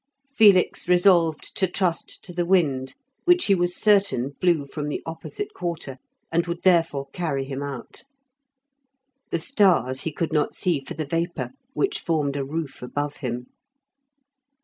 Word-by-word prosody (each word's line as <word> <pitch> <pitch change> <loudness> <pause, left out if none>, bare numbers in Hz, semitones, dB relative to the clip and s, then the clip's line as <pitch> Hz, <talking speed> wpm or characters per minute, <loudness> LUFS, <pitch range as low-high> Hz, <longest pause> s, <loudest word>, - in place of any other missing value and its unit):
Felix 200 -7 +4
resolved 175 -3 +3
to 190 - +2
trust 180 -1 -2
to 180 - -9
the 175 0 0
wind, 150 -8 +1 0.3
which 355 0 +5
he 200 - +4
was 175 -1 +1
certain 200 - +3
blew 170 -5 +3
from 150 +1 -5
the - - -4
opposite 285 - -6
quarter, 165 - -5 0.3
and 170 +1 +1
would 170 0 -4
therefore 165 -7 +2
carry 145 -6 -2
him 135 0 -5
out. 140 -4 -7 1.3
The - - 0
stars 175 - +2
he 160 - -2
could 160 +1 -3
not 150 -2 +1
see 175 -6 +1
for 135 - -8
the 155 +1 -3
vapour, 165 +3 -2 0.2
which 395 +6 0
formed 150 -5 0
a 140 - -1
roof 150 +1 -5
above 145 +4 -3
him. 125 -3 -4
165 Hz, 150 wpm, -24 LUFS, 140-180 Hz, 1.3 s, which